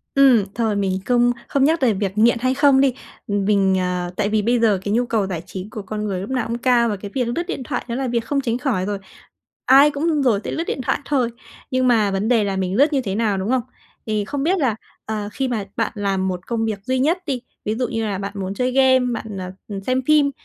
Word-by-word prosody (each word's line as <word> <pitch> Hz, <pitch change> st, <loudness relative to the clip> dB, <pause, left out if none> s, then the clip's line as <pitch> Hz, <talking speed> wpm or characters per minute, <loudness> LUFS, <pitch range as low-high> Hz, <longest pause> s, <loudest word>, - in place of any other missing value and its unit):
Ừm, 265 Hz, -6 st, +6 dB
thôi, 225 Hz, -3 st, 0 dB
mình 190 Hz, -2 st, 0 dB
không 245 Hz, -1 st, +3 dB, 0.2 s
không 275 Hz, -1 st, +2 dB
nhắc 320 Hz, +2 st, +2 dB
về 245 Hz, -4 st, +3 dB
việc 200 Hz, 0 st, -3 dB
nghiện 235 Hz, +2 st, +4 dB
hay 255 Hz, +2 st, +1 dB
không 280 Hz, -1 st, +4 dB
đi, 270 Hz, -3 st, +3 dB, 0.3 s
mình 200 Hz, -1 st, +2 dB
ờ, 180 Hz, -1 st, -2 dB
tại 205 Hz, -1 st, 0 dB
vì 215 Hz, 0 st, +1 dB
bây 235 Hz, +2 st, +2 dB
giờ 215 Hz, -4 st, +3 dB
cái 205 Hz, -, -1 dB
nhu 245 Hz, +1 st, +2 dB
cầu 215 Hz, -4 st, 0 dB
giải 175 Hz, -4 st, -4 dB
trí 190 Hz, +1 st, -7 dB
của 215 Hz, -, -6 dB
con 210 Hz, +2 st, -4 dB
người 195 Hz, -3 st, -2 dB
lúc 200 Hz, +6 st, -6 dB
nào 255 Hz, -3 st, -1 dB
cũng 235 Hz, -, -2 dB
cao, 240 Hz, -1 st, +3 dB
và 210 Hz, -, -1 dB
cái 200 Hz, +1 st, -8 dB
việc 255 Hz, -2 st, +1 dB
lướt 245 Hz, +9 st, -1 dB
điện 280 Hz, -, -3 dB
thoại 250 Hz, 0 st, -3 dB
đó 235 Hz, -, -2 dB
là 260 Hz, +1 st, -2 dB
việc 235 Hz, -1 st, -1 dB
không 285 Hz, -1 st, 0 dB
tránh 240 Hz, -3 st, -1 dB
khỏi 230 Hz, -9 st, -1 dB
rồi, 205 Hz, -1 st, -2 dB, 0.7 s
ai 275 Hz, +3 st, +7 dB
cũng 300 Hz, +1 st, 0 dB
rồi 230 Hz, -7 st, +2 dB
sẽ -, -, -3 dB
lướt 330 Hz, -, -2 dB
điện 265 Hz, -, -3 dB
thoại -, -, 0 dB
thôi. 255 Hz, -5 st, +1 dB, 0.4 s
Nhưng 255 Hz, -1 st, +2 dB
mà 220 Hz, -4 st, +3 dB
vấn 195 Hz, +3 st, -1 dB
đề 230 Hz, -4 st, +3 dB
là 195 Hz, -1 st, -2 dB
mình 190 Hz, 0 st, -1 dB
lướt 290 Hz, +5 st, +4 dB
như 275 Hz, -, +2 dB
thế 195 Hz, -5 st, -3 dB
nào, 210 Hz, -2 st, 0 dB
đúng 190 Hz, +4 st, -2 dB
không? 255 Hz, -2 st, +2 dB, 0.4 s
Thì 215 Hz, -2 st, -1 dB
không 275 Hz, +5 st, -3 dB
biết 365 Hz, +5 st, +2 dB
là, 255 Hz, -9 st, +1 dB, 0.3 s
ờ, 215 Hz, -2 st, -3 dB
khi 265 Hz, +4 st, -2 dB
mà 220 Hz, -5 st, -2 dB
bạn 225 Hz, -, 0 dB
làm 195 Hz, -3 st, -1 dB
một 180 Hz, -1 st, -4 dB
công 230 Hz, -2 st, -1 dB
việc 220 Hz, -2 st, -2 dB
duy 260 Hz, +2 st, 0 dB
nhất 320 Hz, +7 st, +2 dB
đi, 260 Hz, -5 st, -2 dB, 0.2 s
ví 215 Hz, -, -1 dB
dụ 250 Hz, +2 st, -1 dB
như 225 Hz, -3 st, -2 dB
là 200 Hz, -2 st, -2 dB
bạn 200 Hz, 0 st, -4 dB
muốn 195 Hz, 0 st, -4 dB
chơi 250 Hz, +3 st, 0 dB
game, 260 Hz, 0 st, +5 dB, 0.2 s
bạn, 225 Hz, -, -5 dB
ờ, 185 Hz, -1 st, -6 dB, 0.2 s
ừm, 200 Hz, -1 st, -5 dB
xem 255 Hz, +3 st, 0 dB
phim, 300 Hz, -2 st, +4 dB
230 Hz, 265 wpm, -21 LUFS, 200-260 Hz, 0.7 s, ai